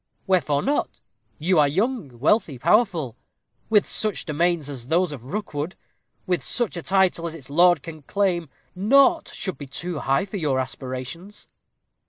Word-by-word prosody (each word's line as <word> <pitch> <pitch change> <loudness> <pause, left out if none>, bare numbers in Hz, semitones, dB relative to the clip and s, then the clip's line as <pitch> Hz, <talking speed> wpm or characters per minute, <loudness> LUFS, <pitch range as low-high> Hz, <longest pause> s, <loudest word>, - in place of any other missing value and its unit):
"Wherefore 165 -7 +2
not? 285 +2 -1 0.4
you 175 +2 +2
are 145 - +5
young, 185 - -1
wealthy, 150 - +2
powerful. 170 - +2 0.5
With 210 -2 +4
such 215 -2 -1
domains 170 0 0
as 130 -4 -7
those 170 +2 +2
of 130 -5 -8
Rookwood 160 -1 -4 0.5
with 180 -1 0
such 240 -6 -1
a 170 - -4
title 185 -2 +2
as 165 - -6
its 140 -4 -11
lord 175 0 +5
can 160 -2 -9
claim, 175 -1 0 0.2
naught 275 - +4
should 190 - -4
be 140 - -7
too 165 +4 -4
high 135 +8 +1
for 200 +1 -6
your 145 -7 0
aspirations." 130 +9 -6
170 Hz, 155 wpm, -24 LUFS, 145-195 Hz, 0.5 s, are